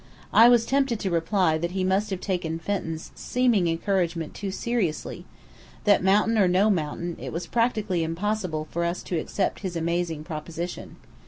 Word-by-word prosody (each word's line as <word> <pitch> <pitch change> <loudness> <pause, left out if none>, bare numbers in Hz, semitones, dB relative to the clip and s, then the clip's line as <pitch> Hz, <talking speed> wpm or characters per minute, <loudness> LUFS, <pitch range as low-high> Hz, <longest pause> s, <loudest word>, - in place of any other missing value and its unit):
I 230 +2 +8
was 240 -2 +5
tempted 270 -3 +1
to 190 - -1
reply 170 -1 +2
that 170 +2 -3
he 190 -1 -1
must 190 +3 +1
have 190 -2 -3
taken 175 -4 -2
Fenton's 165 -2 -4
seeming 240 -8 +1
encouragement 170 -1 -1
too 200 - -5
seriously, 195 -5 -2 0.6
that, 205 -3 +4
mountain 210 +4 +3
or 195 - +5
no 190 +4 +4
mountain, 170 0 -2
it - - -6
was 170 +2 -4
practically 215 -6 0
impossible 165 -2 -2
for 170 - -1
us 170 +1 -2
to 175 - -2
accept 190 +4 -2
his 185 -4 -5
amazing 170 -1 -1
proposition. 165 +2 -6
185 Hz, 165 wpm, -25 LUFS, 165-210 Hz, 0.6 s, I